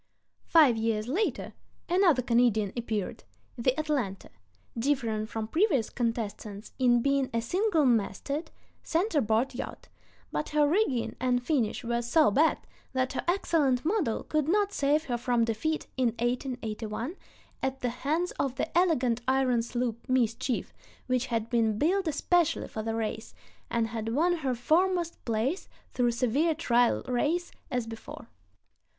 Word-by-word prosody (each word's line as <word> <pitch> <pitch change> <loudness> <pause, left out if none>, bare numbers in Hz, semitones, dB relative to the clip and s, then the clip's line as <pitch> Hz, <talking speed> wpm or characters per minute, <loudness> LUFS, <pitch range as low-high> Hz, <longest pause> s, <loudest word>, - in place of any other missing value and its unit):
Five 295 -8 +6
years 220 -1 -1
later 365 - -1 0.3
another 345 -8 +3
Canadian 230 -4 +2
appeared, 220 -5 -3 0.3
the 255 +3 0
Atalanta, 270 -11 -2 0.4
differing 230 -4 0
from 220 -1 -4
previous 315 - +1
contestants 225 -3 -4
in 240 -2 +4
being 275 -1 +1
a - - +3
single 345 - +1
masted 245 - 0 0.3
center 335 -2 +1
board 225 +4 +1
yacht; 245 - -7 0.4
but 300 - -2
her 300 -1 +3
rigging 290 - +1
and 245 0 +1
finish 245 -6 0
were 235 0 0
so 240 +2 +3
bad 310 +9 +3 0.4
that 260 0 0
her - - -2
excellent 310 -8 +1
model 335 - 0
could 305 -2 0
not 405 +3 +2
save 290 +2 +2
her 245 -5 -2
from 240 -1 +2
defeat 270 +8 -1
(1881) 240 - -2 0.5
at 265 0 -2
the 245 - 0
hands 305 +9 -1
of 265 -2 0
the 315 - -3
elegant 260 -10 +2
iron 260 -2 +2
sloop 240 +1 -3
Mischief 245 0 0 0.3
which 255 0 0
had 230 -2 -1
been 225 -3 +1
built 365 - +1
especially 330 +2 +1
for 220 - -5
the 225 +1 -2
race, 220 0 -4 0.3
and 230 -1 0
had 225 -1 -4
won 350 +4 +2
her 265 -5 -1
foremost 340 +6 +1
place 235 - -1 0.2
through 245 -1 +1
severe 255 +7 +1
trial 245 -6 +2
races, 300 +8 0 0.2
as 245 -3 -1
before. 225 0 -9
250 Hz, 140 wpm, -28 LUFS, 230-310 Hz, 0.5 s, Five